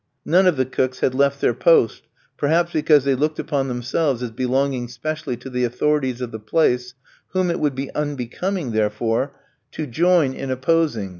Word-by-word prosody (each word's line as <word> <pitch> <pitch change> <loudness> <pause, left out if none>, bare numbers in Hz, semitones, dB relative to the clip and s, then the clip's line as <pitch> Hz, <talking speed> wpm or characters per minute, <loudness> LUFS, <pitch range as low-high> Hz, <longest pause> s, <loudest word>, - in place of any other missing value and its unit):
None 185 +4 +4
of 175 -6 +3
the 130 - +2
cooks 130 0 -2
had 130 - +2
left 140 +1 +1
their - - +3
post, - - +3 0.3
perhaps 165 +4 +1
because 150 -2 +4
they 140 0 +2
looked 150 +4 0
upon 135 -2 -1
themselves 125 +2 -1
as 120 - -4
belonging 130 +1 -1
specially 140 +2 -4
to - - -11
the 125 -1 -2
authorities 130 +1 0
of 125 -2 -4
the 110 - -6
place, 125 +1 0 0.4
whom 185 -2 +1
it 170 - -2
would 145 -3 0
be 135 +1 -5
unbecoming, 145 +3 -3
therefore, 115 +5 0 0.4
to 155 - -4
join 160 +1 +2
in 135 0 -6
opposing. 130 -5 0
135 Hz, 175 wpm, -21 LUFS, 125-155 Hz, 0.4 s, None